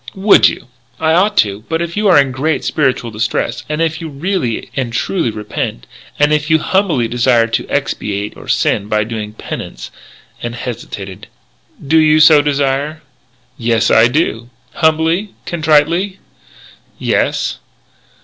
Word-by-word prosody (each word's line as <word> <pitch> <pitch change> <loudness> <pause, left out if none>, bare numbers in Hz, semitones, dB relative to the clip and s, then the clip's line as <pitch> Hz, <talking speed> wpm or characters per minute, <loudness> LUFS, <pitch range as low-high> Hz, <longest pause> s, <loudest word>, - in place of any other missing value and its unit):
"Would 195 +2 +5
you?" - - -8 0.3
"I 160 0 +2
ought 200 +5 +2
to.... 100 0 +1
But 160 - 0
if 170 0 -4
you 210 0 +1
are 185 - +6
in 140 -2 +2
great 145 +5 -1
spiritual 130 -5 0
distress, 115 +2 -2
and 155 +2 0
if 160 0 -2
you 165 - -5
really 145 - -3
and 130 -4 -2
truly 160 +4 -1
repent, 105 - -5 0.3
and 150 +1 +3
if 150 +1 0
you 160 - +5
humbly 160 - +1
desire 120 0 +2
to 115 - -3
expiate 100 0 -2
your - - -13
sin 100 - +1
by 105 0 +1
doing 105 -1 -5
penance - - -7 0.2
" - - -27
And 120 0 -4
hesitated: 100 -6 -7 0.6
"Do 160 +3 +4
you 155 0 +4
so 155 -1 +7
desire?" 145 +2 -1 0.6
"Yes, 115 -1 +1
I 115 +1 +6
do." 120 -4 -1 0.2
"Humbly? 160 +5 +1
Contritely?" 170 +4 +1 0.8
"Yes." - - -1
145 Hz, 150 wpm, -15 LUFS, 115-160 Hz, 0.8 s, so